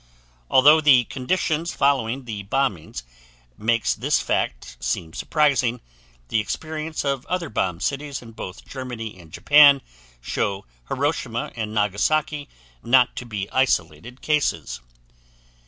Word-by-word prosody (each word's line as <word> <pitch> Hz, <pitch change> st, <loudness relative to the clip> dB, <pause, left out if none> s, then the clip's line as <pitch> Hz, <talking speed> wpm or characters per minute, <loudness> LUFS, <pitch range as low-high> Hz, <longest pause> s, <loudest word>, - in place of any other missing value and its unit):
Although 150 Hz, +4 st, +6 dB
the 135 Hz, -5 st, +6 dB
conditions 160 Hz, +6 st, -2 dB
following 135 Hz, -2 st, +1 dB
the 110 Hz, -4 st, -5 dB
bombings 100 Hz, -, -2 dB, 0.5 s
makes 115 Hz, -, +1 dB
this -, -, 0 dB
fact -, -, -2 dB
seem 80 Hz, +6 st, -3 dB
surprising, 135 Hz, -6 st, +1 dB, 0.5 s
the 115 Hz, -, +2 dB
experience 155 Hz, +7 st, -4 dB
of 140 Hz, -2 st, -1 dB
other 180 Hz, -4 st, -2 dB
bombed 90 Hz, -3 st, -2 dB
cities 140 Hz, 0 st, -2 dB
in 115 Hz, -2 st, -12 dB
both 95 Hz, -3 st, -9 dB
Germany 120 Hz, -6 st, -7 dB
and 80 Hz, -2 st, -15 dB
Japan 145 Hz, -, +6 dB, 0.4 s
show 95 Hz, +10 st, -2 dB, 0.2 s
Hiroshima 130 Hz, -4 st, -2 dB
and 110 Hz, -2 st, -4 dB
Nagasaki 145 Hz, +9 st, 0 dB, 0.3 s
not 125 Hz, 0 st, +4 dB
to 125 Hz, -, -6 dB
be 105 Hz, -3 st, -4 dB
isolated 120 Hz, -, -1 dB
cases. 140 Hz, -, 0 dB
125 Hz, 120 wpm, -23 LUFS, 105-145 Hz, 0.5 s, Although